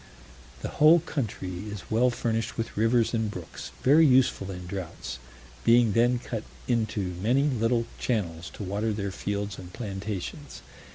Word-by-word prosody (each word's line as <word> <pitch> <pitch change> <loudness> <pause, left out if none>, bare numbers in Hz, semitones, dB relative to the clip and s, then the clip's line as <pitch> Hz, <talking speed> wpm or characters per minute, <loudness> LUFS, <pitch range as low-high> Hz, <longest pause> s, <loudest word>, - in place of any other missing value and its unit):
The - - -1
whole 160 +3 +8
country 105 - -4
is 105 0 -8
well 120 +3 +4
furnished 115 -2 -2
with 115 - -3
rivers 115 +2 +3
and 110 -2 0
brooks, 90 -5 -7
very 150 +5 +7
useful 130 -8 +4
in 90 -2 -6
droughts, 85 -8 -6 0.4
being 115 -1 +5
then 120 +3 +3
cut 115 -2 -5 0.2
into 110 -6 0
many 125 +7 +3
little 120 -4 +1
channels 85 -9 -2
to - - -6
water 105 +3 -1
their 100 -1 -3
fields 100 -1 -3
and 90 -1 -10
plantations. 105 - -5
110 Hz, 150 wpm, -27 LUFS, 100-120 Hz, 0.4 s, whole